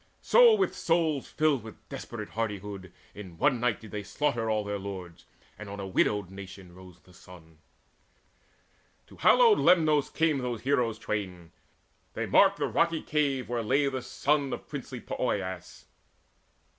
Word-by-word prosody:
So 485 -2 +6
with 390 -2 0
souls 165 -4 0
filled 150 -5 +1
with 110 -1 -13
desperate - - -7
hardihood 100 -4 -5 0.2
In 95 -5 -10
one 135 - +2
night 120 -2 0
did 110 - -13
they 105 - -4
slaughter 115 0 -1
all 110 -1 0
their 105 0 -4
lords; 95 -3 -8 0.3
And 105 -1 -8
on 100 0 -7
a 100 - -4
widowed 95 0 0
nation 95 -2 -11
rose 90 -1 -15
the 90 - -21
sun. 80 -3 -16 1.5
To - - -17
hallowed 470 -4 +5
Lemnos 155 -5 +4
came 160 -3 +1
those 120 -3 -4
heroes 125 -4 0
twain; 95 -6 -5 0.6
They - - -2
marked - - +4
the - - -1
rocky 165 -1 0
cave 140 -4 0
where 120 -1 -2
lay 135 +6 +1
the 130 -1 -4
son 140 +3 0
Of - - -7
princely 130 -3 -7
Poeas. 95 - -4
115 Hz, 155 wpm, -28 LUFS, 95-145 Hz, 1.5 s, So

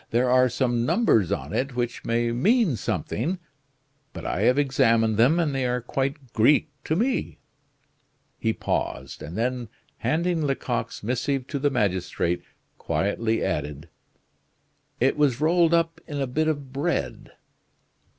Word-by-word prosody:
There 125 +2 +2
are 130 0 +5
some 120 -1 0
numbers 155 - +3
on 65 +4 -3
it 135 -1 -1
which 120 0 -2
may 115 0 0
mean 190 - +3
something; 140 - -2 0.8
but - - -8
I - - -1
have 125 - +4
examined 115 -6 +3
them, 135 +10 +4
and 155 -4 +1
they 135 -1 -1
are 125 0 0
quite 135 +1 -3
Greek 145 +6 +4
to 155 - 0
me." 245 +8 -1 1.0
He 110 - +1
paused, - - -3
and 85 +6 -7
then 120 0 -1 0.3
handing 170 +1 0
Lecoq's 135 -6 -2
missive 125 +3 -1
to 140 - -2
the 145 +1 +2
magistrate, 95 -7 0 0.4
quietly 110 +3 0
added: 75 +2 -3 1.1
"It 130 +4 +2
was 140 -5 +2
rolled 165 +2 +3
up 165 0 0
in 145 -2 -4
a 135 - +1
bit 155 +5 0
of 140 -4 -3
bread." 155 +5 -2
130 Hz, 140 wpm, -25 LUFS, 115-150 Hz, 1.1 s, are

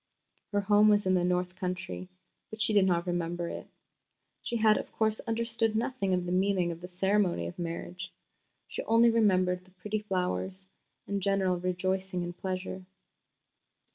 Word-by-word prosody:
Her 205 0 +1
home 205 +1 +5
was 205 -1 +4
in 185 - +3
the 180 -1 +3
north 180 0 0
country, 185 0 -4 0.4
but 220 - -9
she 220 0 +3
did 200 -2 +5
not 170 -1 +1
remember 175 -1 -2
it. - - -7 0.7
She 235 - -2
had, 215 -1 +4
of - - -7
course, 220 -1 0
understood 225 -1 0
nothing 230 -3 -1
of 180 -1 +1
the 175 - -3
meaning 185 -1 +2
of 165 0 -8
the 180 - -7
ceremony 185 - +1
of 85 - -7
marriage. 175 +2 -5 0.6
She - - -4
only 230 +1 +5
remembered 185 -5 +2
the 185 - -22
pretty 200 +4 -4
flowers 190 -1 -2 0.4
and 200 0 -2
general 190 -2 +1
rejoicing 185 +1 -1
and 175 0 -5
pleasure. 185 0 -4
185 Hz, 165 wpm, -30 LUFS, 180-210 Hz, 0.7 s, home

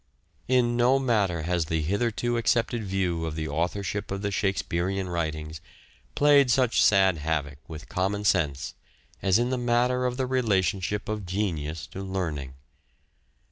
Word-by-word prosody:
In 120 -2 +2
no 125 +3 +4
matter 105 -11 +1
has 85 0 0
the 80 0 -1
hitherto 115 +6 0
accepted 115 0 +1
view 95 -4 -1
of 80 - -5
the 80 - -3
classical 75 +1 -3
authorship 100 +3 -3
of 100 +1 -4
the 100 - -1
Shakespearean 95 -1 -1
writings 80 -2 -3 0.5
played 145 -2 +5
such 125 -1 +3
sad 95 -4 +4
havoc 75 -2 -2
with 80 -1 -9
common 100 +3 -1
sense 75 -7 +1 0.5
as 95 -1 +3
in 120 +2 0
the 130 - 0
matter 125 +1 +1
of 125 0 -3
the 130 - 0
relationship 105 -5 0
of 105 -3 -4
genius 85 -6 -2
to 95 - -8
learning. 80 -9 -4
95 Hz, 150 wpm, -26 LUFS, 80-120 Hz, 0.5 s, played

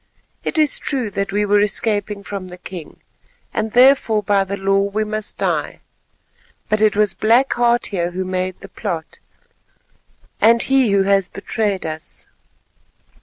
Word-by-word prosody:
It - - -2
is 305 -2 +4
true 255 -7 -2
that 200 0 -2
we 205 +1 +1
were 205 0 +3
escaping 210 0 0
from 195 -2 -6
the 180 0 -10
king, 180 -2 -10 0.5
and 220 0 -2
therefore 245 -4 +4
by 200 -1 +2
the 195 +1 -5
law 195 0 +2
we 200 +2 -1
must 215 0 -4
die; - - -2 0.9
but 215 0 +1
it 215 -1 +3
was 210 -1 +2
Black 235 +5 +3
Heart 240 0 +2
here 175 -2 0
who 185 +1 -4
made 185 0 -3
the - - -9
plot, 170 -7 -5 1.2
and 230 +1 +5
he 265 -3 +3
who 200 -1 +3
has 195 -1 +2
betrayed 205 -1 -2
us. 155 0 -6
205 Hz, 155 wpm, -19 LUFS, 195-220 Hz, 1.2 s, and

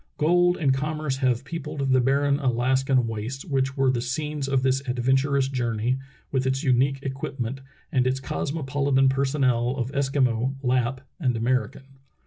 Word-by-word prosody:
Gold 175 +3 +3
and 140 -5 +2
commerce 150 0 -2
have 130 -2 0
peopled 150 -3 -3
the 130 -1 +4
barren 140 +2 +2
Alaskan 130 0 +2
wastes 115 +4 -5
which 135 -4 -1
were 135 -1 +3
the 120 -2 -1
scenes 150 +3 -3
of 135 -1 +1
this 135 0 +2
adventurous 130 +2 +1
jour 120 -4 -2
ney 120 +5 0 0.3
with 130 -1 0
its 130 0 0
unique 135 +1 +2
equipment 135 -1 -4 0.3
and 130 -1 +2
its 130 +1 0
cosmopolitan 140 -1 0
personnel 130 -2 +1
of 125 0 -2
Eskimo, 135 -2 +1
Lapp, 130 0 0 0.2
and 125 -7 0
American. 130 +3 -2
135 Hz, 150 wpm, -25 LUFS, 125-140 Hz, 0.3 s, the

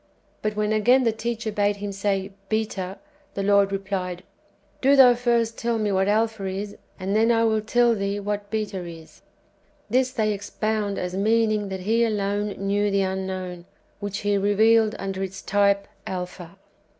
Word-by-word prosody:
But 215 0 -2
when, 210 0 0
again, 245 +5 +4
the 230 - +3
teacher 225 0 -3
bade 205 0 +1
Him 200 0 -5
say, 195 0 -1
" 195 - -36
Beta," 210 -3 -2 0.4
the 195 - -2
Lord 200 0 +4
replied, 190 -2 -3 0.3
" - - -37
Do 275 +2 +5
thou 255 -3 +8
first 235 -2 0
tell 235 -1 0
me 215 -2 0
what 190 0 +2
Alpha 220 0 +1
is, 200 +2 -4 0.2
and 195 +2 -2
then 225 +2 +4
I 230 -1 +3
will 220 -1 +2
tell 240 +2 +3
thee 200 -1 -2
what 205 0 -3
Beta 210 -4 -3
is." 165 -2 -11 0.7
This 255 +1 +3
they 215 -4 0
ex 200 0 -7
pound 215 -2 -1
as 180 0 -3
meaning 215 0 +1
that 190 -1 -5
He 225 +5 +2
alone 205 -2 0 0.2
knew 205 +1 +1
the 200 0 +2
Unknown, 185 -2 -4 0.3
which 205 0 -4
He 205 -1 +2
revealed 215 +2 +3
under 195 -1 -4
its 195 0 -5
type 200 0 +2 0.2
Alpha. 180 -1 -6
205 Hz, 175 wpm, -24 LUFS, 195-220 Hz, 0.7 s, thou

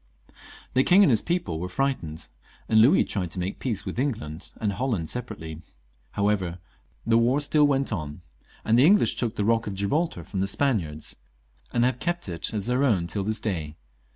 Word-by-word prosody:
The 130 - +4
king 185 +6 +6
and 175 - +5
his 110 - +3
people 165 - -2
were 90 +2 -4
fright 135 +3 0
ened, 80 0 -8 0.4
and 110 -1 +5
Louis 135 +11 +6
tried 90 -5 -3
to 90 - -6
make 90 +2 -3
peace 105 -6 -3
with - - -4
England 105 - -3
and 105 -2 0
Holland 110 -10 -2
separately. 80 -10 -5 0.5
However, 100 -4 0 0.5
the 115 0 +4
war 125 +5 +3
still 145 0 +4
went 135 -4 0
on; 75 -4 -5 0.4
the 115 +4 +4
English 200 +7 +5
took 115 -3 -2
the 105 - -1
Bock 115 +1 +1
of 100 - -4
Gibraltar 100 - -1
from 95 +3 -5
the 95 - +1
Spaniards, 95 - -1 0.5
and 120 - +2
have 125 -1 0
kept 175 -5 -2
it 85 -2 -2
as 105 -3 -2
their 125 +3 +1
own 105 -11 +2
till 85 +4 -3
this 110 +2 -1
day. 80 -8 -3
110 Hz, 190 wpm, -26 LUFS, 90-130 Hz, 0.5 s, king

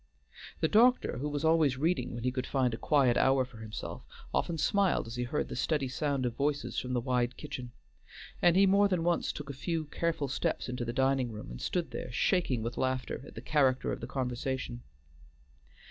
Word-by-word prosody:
The - - +4
doctor, 235 - +4
who 145 +3 -2
was 145 +1 -2
always 160 -5 +4
reading 160 -2 0
when 120 - -5
he 125 - +1
could 130 0 -3
find 130 -4 +1
a - - -3
quiet 135 -5 +3
hour 135 -1 +4
for 125 -2 -15
himself, 110 -1 -6 0.3
often 170 - 0
smiled 195 +5 +2
as 115 - -7
he 125 - -2
heard 140 +5 -1
the - - -6
steady 150 -4 0
sound 140 0 -1
of 120 - -1
voices 145 0 -1
from 125 0 -4
the 125 - +2
wide 125 0 0
kitchen, 125 -2 -6 0.7
and 175 -1 +5
he 195 +1 +6
more 200 +1 +5
than 180 -4 0
once 175 0 +1
took 140 -1 -6
a - - -8
few 160 +4 -2
careful 160 -1 -1
steps 130 - -1
into 125 -1 -3
the 120 - -2
dining 130 -1 +1
room, 105 - -8
and - - -8
stood 175 -2 -1
there 125 - -5
shaking 130 - +1
with 115 +1 -4
laughter 130 -1 -1
at - - -13
the - - -6
character 135 -4 +2
of - - -3
the - - -5
conversation. 125 - -3
135 Hz, 210 wpm, -31 LUFS, 125-160 Hz, 0.7 s, he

